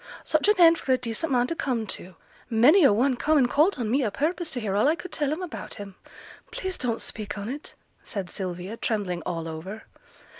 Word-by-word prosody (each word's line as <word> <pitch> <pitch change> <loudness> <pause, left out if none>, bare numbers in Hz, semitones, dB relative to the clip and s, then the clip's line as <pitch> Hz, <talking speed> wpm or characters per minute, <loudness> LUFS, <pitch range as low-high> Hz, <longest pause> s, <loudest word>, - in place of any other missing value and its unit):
Such 310 +3 +1
an 420 - +5
end 335 -1 +7
for 265 - -2
a - - +3
decent 250 +6 -3
man 245 -1 +3
to 335 - -3
come 245 -8 -1
to! 185 -2 -7 0.3
Many 255 - +6
a 275 - +7
one 250 +6 +2
come 305 +5 +2
an' 265 - +5
called 305 +10 +3
on 230 -4 -2
me 270 +2 +2
o' 220 - +1
purpose 320 - -1
to 250 - -3
hear 205 -4 -2
all 210 +7 +3
I 310 - +3
could 365 +1 -9
tell 290 -2 0
'em 325 +5 -3
about 360 - -6
him!' 200 -3 -8 0.6
'Please 375 -1 -4
don't 235 -2 -2
speak 215 -2 -5
on 200 +1 -5
it!' 280 +5 -6 0.3
said 200 -5 -5
Sylvia, 185 +3 -5
trembling 195 -7 -2
all 165 -2 -3
over. 175 +7 -7
245 Hz, 225 wpm, -26 LUFS, 205-305 Hz, 0.6 s, end